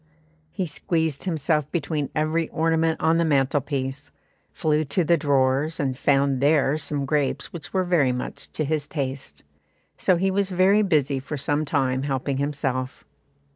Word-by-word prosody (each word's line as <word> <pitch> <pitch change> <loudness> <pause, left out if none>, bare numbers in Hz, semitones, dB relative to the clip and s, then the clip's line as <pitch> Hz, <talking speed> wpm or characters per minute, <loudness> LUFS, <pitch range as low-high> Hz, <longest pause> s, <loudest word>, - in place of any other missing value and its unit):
He 190 +1 -3
squeezed 160 -1 -2
himself 155 -3 0
between 150 -4 -2
every 155 +2 0
ornament 160 0 +1
on 160 +1 +3
the 170 - +2
mantlepiece, 140 -1 0 0.4
flew 155 -1 +1
to 175 +6 0
the 170 +2 +4
drawers, 140 0 +1
and 135 -3 -1
found 135 0 +2
there 145 -1 +3
some 145 -2 -2
grapes 145 -1 -1
which 155 -4 -7
were 190 -1 +1
very 170 -8 +2
much 125 0 -6
to 155 - -1
his 150 0 -1
taste; 135 -2 -5 0.5
so 185 - +3
he 190 +3 +1
was 195 0 0
busy 185 -7 +3
for 140 +3 -6
some 145 +2 -1
time 130 -2 0
helping 135 0 -2
himself. 135 -3 -2
150 Hz, 150 wpm, -24 LUFS, 135-160 Hz, 0.5 s, the